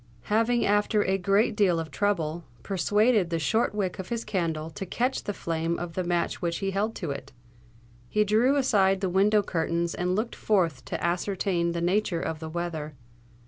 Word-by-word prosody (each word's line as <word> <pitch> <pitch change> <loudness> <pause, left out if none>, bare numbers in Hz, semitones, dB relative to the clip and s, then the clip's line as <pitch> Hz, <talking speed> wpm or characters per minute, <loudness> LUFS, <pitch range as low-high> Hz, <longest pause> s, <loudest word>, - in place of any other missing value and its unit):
Having, 230 +2 +3
after 205 +1 +2
a 190 +1 0
great 200 +4 +2
deal 185 -5 +3
of 160 -2 -5
trouble, 170 -2 -1 0.2
persuaded 205 +1 +2
the 165 - 0
short 220 +7 +1
wick 190 -3 -2
of 185 - -6
his 235 -1 -3
candle 165 -6 -2
to 175 - -6
catch 245 +8 -1
the - - -1
flame 165 -3 -2
of 175 -1 -5
the 185 - -1
match 175 -1 -1
which 170 -1 -1
he 195 0 -2
held 210 +3 -1
to 170 -7 -4
it, 140 - -7 0.8
he 210 - +3
drew 225 +7 +3
aside 195 -8 +3
the 190 - 0
window 205 +3 +4
curtains 170 -1 -1
and 180 +1 -1
looked 225 +3 -2
forth 170 -11 +1
to - - -4
ascertain 175 -1 0
the 170 - -2
nature 180 0 +1
of 160 -1 -3
the 160 0 -6
weather. 160 -3 -4
185 Hz, 185 wpm, -27 LUFS, 170-210 Hz, 0.8 s, window